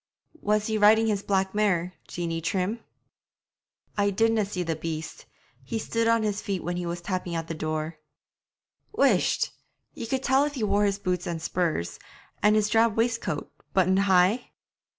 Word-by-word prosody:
'Was 210 0 +1
he 220 -1 0
riding 220 +2 +6
his 210 -3 0
black 190 -1 0
mare, 185 -4 +1
Jeanie 165 -1 -3
Trim?' 190 +6 -1 1.2
'I 200 0 +3
didna 225 +1 +2
see 190 -2 -3
the 165 -1 -2
beast. 155 0 -6 0.4
He 135 - -3
stood 230 +1 -1
on 230 -1 +3
his 210 -1 -1
feet 195 -4 -3
when 175 +1 -2
he 175 -1 -3
was 170 +1 -4
tapping 180 -1 -3
at 165 -1 -3
the 165 - -3
door.' 155 0 -3 0.9
'Whisht! 425 - +2 0.4
Ye 230 - -6
could 265 +2 -1
tell 270 +1 +4
if 295 0 -2
he 240 - -2
wore 205 0 +2
his 200 -1 +1
boots 180 -3 -2
and 170 -1 -3
spurs, 160 - -2 0.4
an' 210 +1 +5
his 215 -1 +3
drab 225 0 +3
waistcoat, 230 -10 -1 0.2
buttoned 190 0 +4
high?' 195 +4 +3
195 Hz, 170 wpm, -26 LUFS, 175-220 Hz, 1.2 s, riding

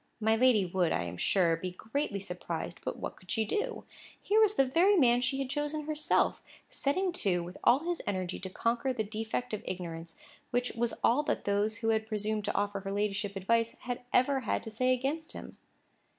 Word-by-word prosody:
My 220 0 +3
lady 230 -4 +4
would, 180 -1 +1
I 85 - 0
am 85 0 -5
sure, 170 - +2
be 180 +3 -4
greatly 220 +4 -3
surprised, 175 -3 -5
but - - -3
what - - -5
could 185 - -20
she 220 +1 +1
do? 440 - -2 0.4
Here 430 +2 +3
was 425 -1 +4
the 270 - +4
very 345 +10 +4
man 245 -7 +5
she 255 +2 0
had 270 -1 -2
chosen 295 +1 -1
herself, 305 0 +1 0.3
setting 365 +7 +1
to 185 - +1
with 175 +2 -9
all 275 +8 +4
his 350 -1 -1
energy 185 -3 -2
to 190 - -6
conquer 235 +6 0
the 225 -3 -1
defect 220 +3 -3
of 215 - -2
ignorance, 165 -2 -6 0.3
which 245 0 0
was 235 0 -1
all 250 +6 +4
that - - -1
those 205 +2 +1
who - - +3
had 220 0 +1
presumed 215 -1 -1
to - - -2
offer 205 0 0
her 195 0 -5
ladyship 205 0 -1
advice 230 +4 +1
had 245 -1 -4
ever 270 +2 +3
had 230 - -1
to 220 - -7
say 255 +4 +1
against 280 +6 -1
him. - - -9
220 Hz, 205 wpm, -31 LUFS, 195-265 Hz, 0.4 s, man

